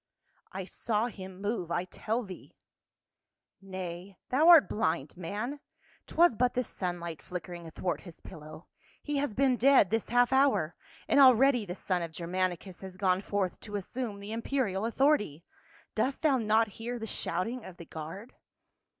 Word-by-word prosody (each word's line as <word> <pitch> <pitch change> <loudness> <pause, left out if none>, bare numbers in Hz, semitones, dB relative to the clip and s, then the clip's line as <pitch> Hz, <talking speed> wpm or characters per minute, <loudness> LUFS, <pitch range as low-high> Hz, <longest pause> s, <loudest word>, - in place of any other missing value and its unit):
I 190 0 -5
SAW 215 +3 -1
him 190 -3 -10
move, 205 -4 -2
I 175 - 0
tell 220 +6 -2
thee." 190 -4 -11 0.6
" - - -60 0.2
Nay, 185 0 -7
thou 295 +6 +3
art 335 -4 +9
blind, 160 -8 -1
man; 210 - -4 0.5
'twas 345 -4 +4
but 245 +2 +1
the 250 - +1
sun 180 -5 -4
light 170 -2 -6
flickering 175 -1 -7
athwart 170 +2 -3
his 175 -4 -12
pillow. 155 +1 -11 0.4
He 295 -1 -2
has 275 -6 -1
been 265 -2 +3
dead 260 -6 +5
this 225 -1 0
half 245 +2 +3
hour, 265 - +3 0.3
and 285 - +4
already 255 -3 +6
the 180 - -4
son 185 -2 -1
of 165 -1 -4
Germanicus 180 +2 -3
has 190 -1 -8
gone 185 -1 +2
forth 200 -3 -2
to 205 -2 -7
assume 205 +1 -4
the 200 +1 -8
imperial 225 -4 -1
authority. 230 - +1 0.5
Dost 270 +3 -1
thou 280 -4 +4
not 220 0 +3
hear 240 +2 -3
the 225 - -5
shouting 225 +4 -3
of 180 -2 -10
the 170 - -10
guard?" 165 +11 -8
200 Hz, 165 wpm, -30 LUFS, 180-245 Hz, 0.6 s, art